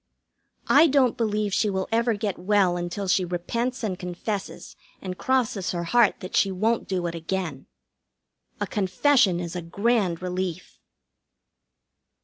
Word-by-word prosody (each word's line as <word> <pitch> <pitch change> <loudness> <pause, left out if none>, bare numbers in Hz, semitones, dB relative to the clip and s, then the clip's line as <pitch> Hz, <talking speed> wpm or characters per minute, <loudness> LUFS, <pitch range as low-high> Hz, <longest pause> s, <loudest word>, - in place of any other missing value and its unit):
I 305 +4 +6
don't 265 -5 +3
believe 215 -4 -1
she 210 - +2
will 190 -1 -2
ever 230 0 +2
get 205 -3 -3
well 190 -1 +2
until 175 +3 -4
she 185 +1 +3
repents 230 +9 -3
and 190 -4 -2
confesses 190 +3 -5 0.2
and 185 -1 -5
crosses 230 -6 0
her 170 -1 -2
heart 235 +4 +3
that 185 - -6
she 195 - +3
won't 220 +5 0
do 185 -2 -2
it 170 - -2
again. 165 -4 -4 0.9
A - - 0
confession 200 0 +2
is 175 0 -5
a 175 - -3
grand 195 0 0
relief. 180 -2 -4
190 Hz, 140 wpm, -25 LUFS, 180-225 Hz, 0.9 s, I